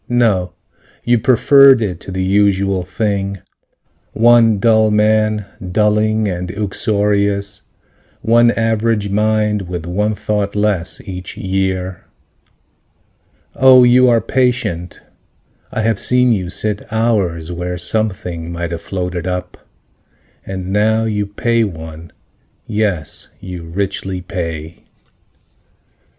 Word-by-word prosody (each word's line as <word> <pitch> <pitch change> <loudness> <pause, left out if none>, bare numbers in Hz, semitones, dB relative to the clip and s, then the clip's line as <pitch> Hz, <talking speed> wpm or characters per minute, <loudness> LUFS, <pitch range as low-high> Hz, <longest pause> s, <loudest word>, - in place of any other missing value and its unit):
No. 110 -7 +1 0.5
You 120 -1 +2
preferred 135 +3 +6
it 95 -7 -3
to - - -9
the 95 0 -2
usual 100 -1 +2
thing: 100 +1 -2 0.8
One 115 -1 +5
dull 110 +1 +3
man, 110 0 +2 0.3
dulling 105 +1 +2
and 90 -1 -4
uxorious, 100 0 -1 0.6
One 120 +2 +4
average 115 -2 0
mind 105 -2 0
with 90 -2 -5
one 105 +5 -1
thought 105 -1 -2
less, 105 -4 -1
each 90 -1 -7
year. 95 -1 -2 1.5
Oh, 130 -1 +7
you 125 +1 +5
are 115 -1 +3
patient, 110 -10 -1 0.7
I 110 - -2
have 110 -2 0
seen 125 0 +3
you 95 -5 -1
sit 105 +2 -2
Hours, 100 -8 0
where 90 +1 -4
something 90 -4 -2
might 85 0 -4
have 85 - -4
floated 90 -2 -4
up. 90 0 -4 0.9
And 95 0 -5
now 110 +2 +2
you 105 -2 -1
pay 115 +3 0
one. 80 -4 -7 0.5
Yes, 100 -8 -2
you 90 -2 -8
richly 95 +1 -3
pay. 85 -3 -6
100 Hz, 110 wpm, -16 LUFS, 90-110 Hz, 1.5 s, Oh